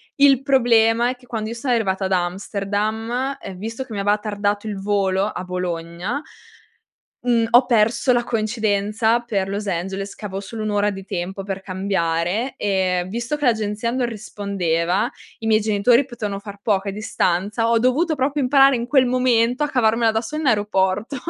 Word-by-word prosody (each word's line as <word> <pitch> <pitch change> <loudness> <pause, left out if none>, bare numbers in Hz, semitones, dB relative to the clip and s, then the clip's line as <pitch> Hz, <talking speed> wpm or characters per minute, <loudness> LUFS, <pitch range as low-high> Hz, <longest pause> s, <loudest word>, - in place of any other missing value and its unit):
Il 275 -2 +5
problema 235 -3 +3
è 255 - -3
che 250 0 -21
quando 220 -2 -4
io 235 - -5
sono 245 +2 -1
arrivata 195 -4 0
ad 190 - -3
Amsterdam 210 +8 -2
e 190 - -8
visto 225 +7 -5
che 240 -4 -10
mi 200 - -3
aveva 205 +1 +2
tardato 205 0 -2
il 205 -2 -4
volo 195 -1 +1
a 185 - -5
Bologna, 180 - -4 1.0
mhmm, 235 -2 +2
ho 245 +2 +6
perso 235 +2 +3
la 240 0 +1
coincidenza 220 0 0
per 205 -5 -2
Los 200 +2 -3
Angeles 195 +3 -3
che 210 - -7
avevo 195 -1 -5
solo 215 +2 -7
1 215 - -1
ora 205 0 +1
di 195 -1 -7
tempo 190 +1 -4
per 195 -1 -5
cambiare 190 +4 -1
e 185 -3 0
visto 235 +7 -3
che 290 - -1
l'agenzia 220 0 0
non 255 0 -1
rispondeva, 195 -5 -1 0.3
i 225 - -6
miei 220 -1 +4
genitori 220 +5 +3
potevano 215 -6 -5
far 200 -1 -10
poco 200 -2 0
a - - 0
distanza, 210 +2 0
ho 230 - +4
dovuto 280 +8 +2
proprio 280 +1 0
imparare 270 +1 +5
in 235 0 -3
quel 260 -2 +4
momento 250 +1 +2
a 295 - -2
cavarmela 230 -2 +3
da 220 0 0
sola 305 +6 -5
in 285 - +2
aeroporto. 205 +1 +1
215 Hz, 180 wpm, -21 LUFS, 195-240 Hz, 1.0 s, ho